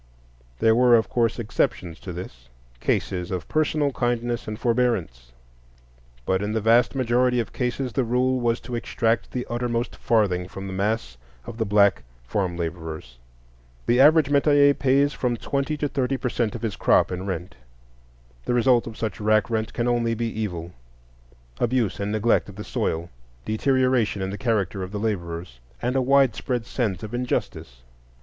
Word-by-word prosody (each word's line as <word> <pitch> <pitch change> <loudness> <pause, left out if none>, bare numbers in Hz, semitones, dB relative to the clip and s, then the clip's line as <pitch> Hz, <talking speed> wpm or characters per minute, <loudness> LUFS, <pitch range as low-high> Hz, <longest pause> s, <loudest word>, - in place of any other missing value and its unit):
There 110 - +4
were, 125 0 +6
of 110 - +2
course, 115 -2 +1
exceptions 90 -7 -2
to 95 - -7
this,—cases - - -4
of 90 -3 -4
personal 155 -2 +1
kindness 120 -1 -1
and 110 0 -4
forbearance; 115 - 0 0.9
but 95 0 +1
in 105 +1 -2
the 110 - +1
vast 115 +4 +3
majority 125 -1 +2
of 115 - -3
cases 125 0 -2
the 135 - +1
rule 125 +2 +1
was 120 -1 +1
to 125 - -8
extract 115 -1 0
the 125 -1 -4
uttermost 120 0 -2
farthing 95 -6 +1
from 95 +1 -8
the 95 - -5
mass 100 - -2 0.3
of 115 - -8
the 110 - +1
black 100 0 +4 0.2
farm 90 +6 -2
laborers. 80 -7 -6 0.7
The 120 +1 +3
average 150 0 +6
metayer 145 0 +5
pays 140 +1 +2
from 120 -2 -1
twenty 140 +5 -2
to 145 - -1
thirty 135 -1 -1
per 125 - -2
cent 115 -3 -1
of - - -7
his 110 -3 -2
crop - - +3
in 90 +2 -4
rent. 95 0 -4 0.9
The 120 - 0
result 120 -1 +3
of 110 - -8
such 110 -3 -3
rack 110 +1 +2
rent 110 -1 -1
can 120 0 -1
only 120 -1 +1
be 115 +1 -2
evil,—abuse 60 - -5
and 100 +1 -2
neglect 110 0 +1
of 100 - -11
the 105 - -6
soil, 85 -3 -2 0.3
deterioration 125 -3 +1
in 95 - -3
the 100 - -5
character 105 -6 0
of 95 0 -5
the 105 - -4
laborers, 85 - -4 0.2
and 125 +2 -1
a 135 - +3
widespread 130 -2 +2
sense 105 -9 -2
of 110 +2 -7
injustice. 120 - -3
115 Hz, 165 wpm, -24 LUFS, 95-125 Hz, 0.9 s, were